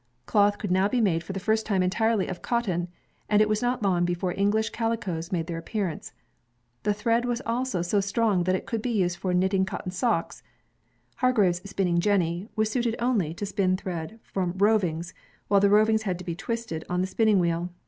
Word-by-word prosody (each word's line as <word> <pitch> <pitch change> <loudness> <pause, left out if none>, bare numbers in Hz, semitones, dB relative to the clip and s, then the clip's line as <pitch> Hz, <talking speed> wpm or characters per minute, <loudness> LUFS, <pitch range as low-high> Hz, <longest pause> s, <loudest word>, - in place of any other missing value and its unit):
Cloth 205 -1 +3
could 205 - -4
now 190 +2 +3
be 250 +4 0
made 175 -7 +2
for 185 - -7
the 195 - -4
first 220 +3 +1
time 195 -4 +1
entirely 215 +2 +1
of 185 - -6
cotton, 190 -8 -1 0.4
and 210 - +4
it 215 - +5
was 215 0 0
not 245 -2 0
long 180 -3 +2
before 175 +1 -1
English 210 +3 +1
calicoes 215 -8 -2
made 170 -3 -1
their 170 -1 -4
appearance. 175 - -4 0.7
The 210 - +1
thread 230 +3 +1
was 240 -1 -1
also 230 -6 -1
so 190 +4 +1
strong 200 -2 +1
that 185 +1 +2
it - - -4
could 225 -2 -3
be 250 - -2
used 180 -6 0
for 185 +1 -2
knitting 190 +2 +2
cotton 190 -1 -4
socks. 185 -2 -1 0.8
Hargreaves' 200 -7 +2
spinning 180 -3 +1
jenny 180 0 0
was 220 -1 +1
suited 235 -2 0
only 235 -10 +1
to 205 - -4
spin 195 -2 +1
thread 185 +2 -6
from 180 -3 -2
rovings, 180 -5 +1 0.4
while 200 - +5
the 200 - +5
rovings 215 +1 +4
had 190 -5 -2
to 180 - -10
be 170 - -2
twisted 220 -3 -4
on 180 0 0
the 185 - 0
spinning 215 +1 +3
wheel. 170 0 0
195 Hz, 200 wpm, -26 LUFS, 180-220 Hz, 0.8 s, it